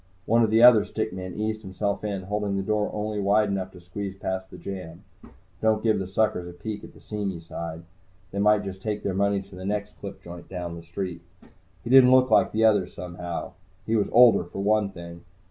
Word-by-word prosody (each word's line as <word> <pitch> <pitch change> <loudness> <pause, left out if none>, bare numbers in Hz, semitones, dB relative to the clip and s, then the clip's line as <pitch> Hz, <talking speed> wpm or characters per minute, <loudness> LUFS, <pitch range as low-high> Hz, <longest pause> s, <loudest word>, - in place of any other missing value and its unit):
One 115 +2 +3
of 110 - +2
the 110 +2 +4
other 120 -4 +8
stick 110 -2 -3
men 95 -1 -6
eased 110 0 -2
himself 100 +2 -3
in, 100 -3 -3
holding 100 0 -2
the 95 - -1
door 105 +1 0
only 105 0 -3
wide 100 +1 +3
enough 95 -2 -2
to 90 - -12
squeeze 95 +2 -6
past 95 -1 -4
the - - -11
jamb. 90 -4 -8 0.6
Don't 110 -1 +2
give 110 -3 +2
the 95 - -4
suckers 95 -2 0
a 90 - -9
peek 105 +2 -6
at - - -12
the - - -15
seamy 100 -4 -4
side. 85 0 -7 0.5
They 100 - -3
might 105 0 +4
just 95 -1 -7
take 105 0 -3
their 100 - -1
money 100 +1 +1
to 95 -1 -15
the 90 - -8
next 100 +1 -3
clip - - -8
joint 85 0 -10
down 90 -2 -5
the 85 - -8
street. 85 +1 -5 0.6
He 120 - -4
didn't 130 -1 +8
look 130 0 +5
like - - +4
the 110 +1 +2
others, 100 -5 +2
somehow. 90 -1 -6 0.3
He 115 - 0
was 105 - +2
older, 120 -5 +7
for 95 +3 -6
one 105 0 +2
thing. 85 -2 -10
100 Hz, 220 wpm, -26 LUFS, 90-110 Hz, 0.6 s, other